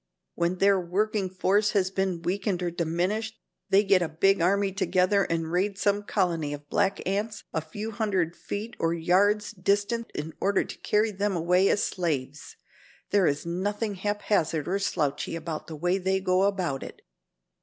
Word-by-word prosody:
When 170 Hz, +1 st, 0 dB
their 195 Hz, 0 st, +4 dB
working 195 Hz, +2 st, -1 dB
force 200 Hz, +3 st, +1 dB
has 190 Hz, -3 st, +1 dB
been 190 Hz, -3 st, -1 dB
weakened 190 Hz, 0 st, -1 dB
or 175 Hz, -, -1 dB
diminished, 180 Hz, +7 st, -1 dB, 0.3 s
they 200 Hz, +1 st, +5 dB
get 195 Hz, -2 st, +4 dB
a 170 Hz, -, -1 dB
big 195 Hz, +4 st, +2 dB
army 195 Hz, +3 st, +2 dB
together 190 Hz, 0 st, +2 dB
and 165 Hz, -1 st, -2 dB
raid 190 Hz, +3 st, 0 dB
some 205 Hz, +1 st, +1 dB
colony 170 Hz, -8 st, -1 dB
of 145 Hz, 0 st, -9 dB
black 195 Hz, -2 st, 0 dB
ants 205 Hz, +2 st, -2 dB
a 160 Hz, -, 0 dB
few 205 Hz, +8 st, -6 dB
hundred 195 Hz, -6 st, -1 dB
feet 215 Hz, +4 st, -6 dB
or 165 Hz, 0 st, +1 dB
yards 200 Hz, +6 st, +2 dB
distant 205 Hz, +4 st, 0 dB
in 155 Hz, +2 st, -4 dB
order 200 Hz, +1 st, +2 dB
to -, -, -9 dB
carry 215 Hz, +1 st, +1 dB
them 200 Hz, 0 st, -1 dB
away 180 Hz, +3 st, +3 dB
as -, -, +2 dB
slaves. 145 Hz, -5 st, -3 dB, 0.6 s
There 200 Hz, -3 st, +4 dB
is 145 Hz, +2 st, -1 dB
nothing 205 Hz, +5 st, -2 dB
haphazard 195 Hz, -5 st, -1 dB
or 195 Hz, +3 st, 0 dB
slouchy 155 Hz, -5 st, -1 dB
about 165 Hz, -1 st, -5 dB
the 160 Hz, -, -7 dB
way 175 Hz, +5 st, 0 dB
they 190 Hz, +1 st, +1 dB
go 185 Hz, 0 st, +2 dB
about 180 Hz, -9 st, -1 dB
it. -, -, -10 dB
190 Hz, 170 wpm, -27 LUFS, 170-205 Hz, 0.6 s, they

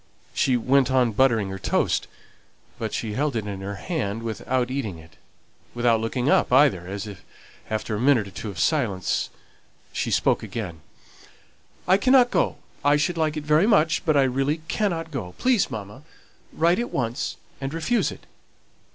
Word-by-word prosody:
She 130 Hz, -2 st, +2 dB
went 130 Hz, +2 st, +3 dB
on 130 Hz, -3 st, +3 dB
buttering 110 Hz, -3 st, +2 dB
her 95 Hz, 0 st, -6 dB
toast, -, -, 0 dB, 0.7 s
but 110 Hz, -1 st, -3 dB
she 110 Hz, -2 st, -3 dB
held 140 Hz, +3 st, -1 dB
it 110 Hz, -2 st, -2 dB
in 100 Hz, -2 st, -5 dB
her 100 Hz, +1 st, -5 dB
hand 115 Hz, -, -3 dB
without 120 Hz, +3 st, -1 dB
eating 115 Hz, -10 st, -3 dB
it; 80 Hz, -1 st, -16 dB, 0.6 s
without 120 Hz, -2 st, +3 dB
looking 120 Hz, +3 st, -2 dB
up 145 Hz, -, +3 dB
either, 125 Hz, -10 st, +4 dB
as, 100 Hz, +2 st, -5 dB, 0.6 s
after 110 Hz, 0 st, -2 dB
a 105 Hz, -, -1 dB
minute 125 Hz, -5 st, +3 dB
or -, -, -11 dB
two 105 Hz, -, -6 dB
of 95 Hz, -, -8 dB
silence, 110 Hz, -, 0 dB, 0.6 s
she -, -, -1 dB
spoke -, -, +2 dB
again: 90 Hz, -9 st, -6 dB, 1.1 s
"I 185 Hz, +1 st, +5 dB
cannot 255 Hz, +3 st, +5 dB
go. -, -, +1 dB, 0.3 s
I 145 Hz, +1 st, +4 dB
should 150 Hz, +4 st, 0 dB
like 155 Hz, -2 st, 0 dB
it 150 Hz, -, -4 dB
very 150 Hz, +6 st, +3 dB
much; 165 Hz, -7 st, +3 dB
but 155 Hz, -4 st, +2 dB
I 140 Hz, -, +5 dB
really 135 Hz, +4 st, 0 dB
cannot 165 Hz, -5 st, -1 dB
go. 105 Hz, -11 st, -5 dB
Please, 250 Hz, -5 st, +2 dB
mamma, 110 Hz, +1 st, -7 dB, 0.5 s
write 170 Hz, +5 st, +2 dB
at 240 Hz, -, -2 dB
once, 120 Hz, +1 st, -2 dB, 0.3 s
and 135 Hz, 0 st, -3 dB
refuse 165 Hz, +10 st, 0 dB
it." -, -, -12 dB
130 Hz, 170 wpm, -24 LUFS, 105-155 Hz, 1.1 s, I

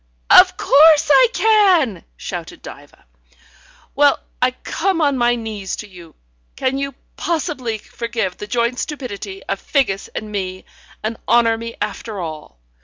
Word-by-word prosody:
"Of -, -, +7 dB
course 310 Hz, +1 st, +5 dB
I -, -, +7 dB
can!" 380 Hz, -, +3 dB
shouted -, -, -7 dB
Diva. -, -, -13 dB, 0.9 s
"Well, 285 Hz, 0 st, +4 dB, 0.2 s
I 250 Hz, -, +4 dB
come 335 Hz, +8 st, -2 dB
on 285 Hz, -3 st, +2 dB
my 240 Hz, -1 st, +2 dB
knees 215 Hz, -4 st, -5 dB
to 210 Hz, -, -8 dB
you. 175 Hz, -4 st, -14 dB, 0.4 s
Can 260 Hz, +1 st, -1 dB
you 275 Hz, 0 st, -4 dB, 0.2 s
possibly 280 Hz, -9 st, -2 dB
forgive 225 Hz, -4 st, -4 dB
the 210 Hz, -, -7 dB
joint 235 Hz, +2 st, 0 dB
stupidity 205 Hz, -9 st, -6 dB
of 195 Hz, -, -4 dB
Figgis 220 Hz, -9 st, 0 dB
and 215 Hz, -1 st, -5 dB
me, 185 Hz, -2 st, -4 dB, 0.4 s
and 220 Hz, +1 st, -3 dB
honour 235 Hz, -1 st, +4 dB
me 230 Hz, +1 st, -7 dB
after 210 Hz, 0 st, -4 dB
all? 155 Hz, -, -7 dB
235 Hz, 140 wpm, -19 LUFS, 205-280 Hz, 0.9 s, Of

